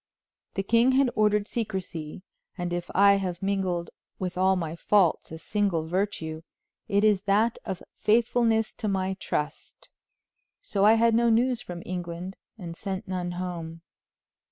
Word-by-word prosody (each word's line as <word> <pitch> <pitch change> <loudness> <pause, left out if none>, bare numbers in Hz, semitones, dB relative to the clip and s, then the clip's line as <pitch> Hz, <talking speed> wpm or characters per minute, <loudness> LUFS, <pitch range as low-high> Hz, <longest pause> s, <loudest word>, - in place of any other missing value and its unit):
The 195 - -1
king 235 +5 +4
had 265 -1 +3
ordered 210 -1 +2
secrecy, 185 -9 -4 0.3
and 175 -1 -3
if 175 0 -3
I 200 +1 +6
have 185 -2 -4
mingled 185 -4 -1 0.3
with 185 -1 -4
all 190 +1 +3
my 165 -3 -3
faults 180 -2 +2
a 160 - -6
single 185 -3 -1
virtue 165 -3 -2 0.5
it 200 +1 +2
is 210 -3 +4
that 220 +4 +3
of 190 -3 -5 0.2
faithfulness 225 0 +2
to 215 - -2
my 190 -1 0
trust. 150 - -4 0.7
So 200 -1 0
I 215 - +8
had 230 0 +4
no 235 +1 +4
news 240 +2 +2
from 175 -6 -8
England 180 +1 -5 0.2
and 170 -5 -7
sent 195 +2 -5
none 180 -1 -3
home. 170 -2 -5
190 Hz, 150 wpm, -27 LUFS, 175-215 Hz, 0.7 s, I